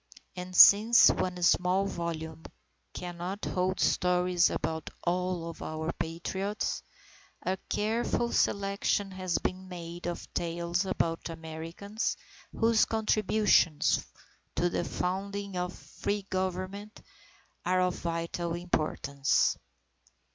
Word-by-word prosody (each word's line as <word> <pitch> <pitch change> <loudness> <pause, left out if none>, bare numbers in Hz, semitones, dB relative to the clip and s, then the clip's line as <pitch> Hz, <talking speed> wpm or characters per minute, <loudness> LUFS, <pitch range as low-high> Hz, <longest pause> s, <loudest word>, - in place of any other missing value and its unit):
And 180 0 -7
since 220 +6 +9
one 180 -1 -2
small 180 +3 +3
volume 165 -3 -4 0.5
cannot 180 +3 -5
hold 185 +1 -1
stories 180 -1 +3
about 160 -1 -3
all 180 -1 -1
of 165 - -8
our 160 +1 -3
Patriots, 190 +5 -3 0.6
a 185 - 0
careful 230 +2 0
selection 200 0 +1
has 185 -2 -1
been 185 0 -3
made 175 -1 -7
of 175 - -4
tales 170 +2 -1
about 165 -3 -1
Americans 165 +6 -4 0.3
whose 225 -1 +3
contributions 215 -7 +2 0.5
to 175 0 +1
the - - 0
founding 200 +2 -3
of 180 0 -1
free 205 0 -4
Government 190 +3 -3 0.6
are 185 0 +2
of 180 -1 +2
vital 170 0 -3
importance. 150 -5 +1
180 Hz, 105 wpm, -30 LUFS, 170-195 Hz, 0.6 s, since